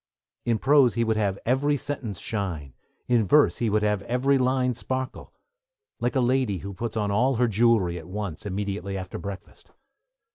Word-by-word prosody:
In 115 -2 +2
prose 135 0 +4
he 115 - +2
would 110 -1 +1
have 100 -3 0
every 145 +4 +2
sentence 135 -8 -5
shine, 85 - -4 0.3
in 115 -4 +2
verse 150 +9 +4
he 115 - 0
would 105 0 +1
have 105 -1 +1
every 125 +6 +1
line 130 0 +1
sparkle; 130 +2 -5 0.7
like 120 +2 -1
a - - +3
lady 125 -5 +1
who 100 +3 -7
puts 115 +4 -4
on 105 -2 0
all 125 +6 +2
her 120 +1 +2
jewellery 110 -5 +2
at 80 - -12
once, 100 -4 -5
immediately 100 -1 -3
after 90 -2 -6
breakfast. 95 +2 -9
110 Hz, 175 wpm, -25 LUFS, 100-125 Hz, 0.7 s, prose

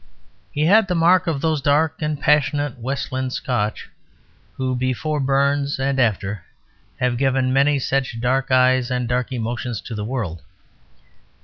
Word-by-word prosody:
He 150 +1 0
had 205 +4 +5
the 180 - -1
mark 175 +2 +4
of 150 -4 -1
those 155 -2 0
dark 155 +3 +1
and 150 -1 -2
passionate 145 -2 +1
Westland 130 +1 -3
Scotch, 110 -5 -2 0.7
who 130 -1 -2
before 130 +5 -1
Burns 140 +1 +1
and 135 0 0
after 105 -5 0 0.6
have 125 -1 0
given 130 -1 +1
many 140 +2 +3
such 135 -3 -1
dark 130 +3 0
eyes 130 -1 +3
and 125 -1 -1
dark 125 +1 -1
emotions 120 -1 -3
to 115 - -8
the 105 -1 -4
world. 105 -9 -4
130 Hz, 145 wpm, -21 LUFS, 125-145 Hz, 0.7 s, had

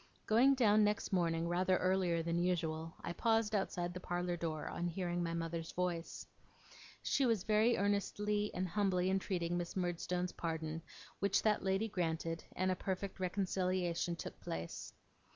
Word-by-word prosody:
Going 250 +5 +5
down 215 -4 +5
next 210 -1 0
morning 170 -2 +1
rather 185 +2 +2
earlier 185 -3 +2
than 170 +1 0
usual, 165 -2 -1
I 170 - -3
paused 225 +2 +2
outside 175 -3 -1
the 185 - -5
parlour 175 0 -1
door, 160 -2 -3
on 175 - -2
hearing 175 0 -2
my 170 -1 -1
mother's 165 0 -3
voice. 175 -2 -2 0.8
She 280 - +2
was 225 -7 +2
very 220 +3 +3
earnestly 205 +1 0
and 185 - 0
humbly 185 0 +1
entreating 180 -3 0
Miss 170 -1 -5
Murdstone's 180 0 -1
pardon, 160 -1 -3 0.4
which 200 0 +2
that 215 -1 +3
lady 195 +3 +1
granted, 165 -4 -2
and 185 +1 +1
a - - +1
perfect 190 +1 -3
reconciliation 185 -2 0
took - - -7
place. 80 +1 -5
180 Hz, 150 wpm, -36 LUFS, 170-200 Hz, 0.8 s, Going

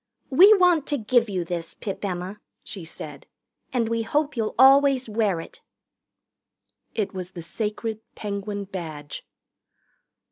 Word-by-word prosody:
"We 370 +10 +8
want 360 -6 +4
to 290 - 0
give 235 0 +2
you 185 -3 -2
this, 165 -1 -5
Pip 200 -1 -6
Emma," 185 +1 -4 0.2
she 195 -5 -7
said, 150 -3 -9 0.4
"and 240 -3 +1
we 230 0 0
hope 295 +5 0
you'll 220 -2 -2
always 270 0 +6
wear 210 -5 0
it." - - -11 1.3
It 210 -3 -1
was 185 -1 -5
the 170 - -7
sacred 215 +4 -3 0.2
Penguin 205 0 -4
Badge. 160 -7 -7
210 Hz, 135 wpm, -25 LUFS, 180-255 Hz, 1.3 s, We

